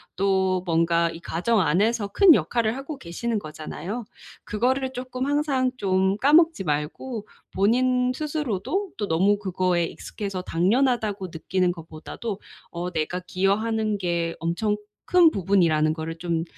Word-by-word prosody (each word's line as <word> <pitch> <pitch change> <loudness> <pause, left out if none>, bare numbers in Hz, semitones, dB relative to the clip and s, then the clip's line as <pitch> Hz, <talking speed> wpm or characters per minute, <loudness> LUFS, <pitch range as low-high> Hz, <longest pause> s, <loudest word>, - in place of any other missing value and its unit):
또 190 -1 +1
뭔가 170 0 +2
이 165 - -8
가정 190 +7 0
안에서 200 +6 +2
큰 345 - +6
역할을 235 -2 0
하고 275 +2 -6
계시는 230 +3 -3
거잖아요. 185 +7 -6 0.4
그거를 260 +5 0
쪼끔 255 +1 -4
항상 280 -3 +1
좀 190 -3 +1
까먹지 310 - +4
말고 185 - -3 0.2
본인 250 +5 +2
스스로도 300 - -2
또 205 -2 -3
너무 195 +5 +3
그거에 185 -3 0
익숙해서 195 0 -6
'당연하다.'고 210 +2 +1
느끼는 180 +2 0
것보다도 165 +6 -7 0.3
어 175 +1 -4
'내가 170 +2 -2
기여하는 215 +3 0
게 170 -3 -1
엄청 205 +6 -1 0.3
큰 350 -3 +7
부분이라는 165 -5 +2
거를 165 +1 -5
좀 165 -2 -1
200 Hz, 295 characters per minute, -24 LUFS, 175-250 Hz, 0.4 s, 큰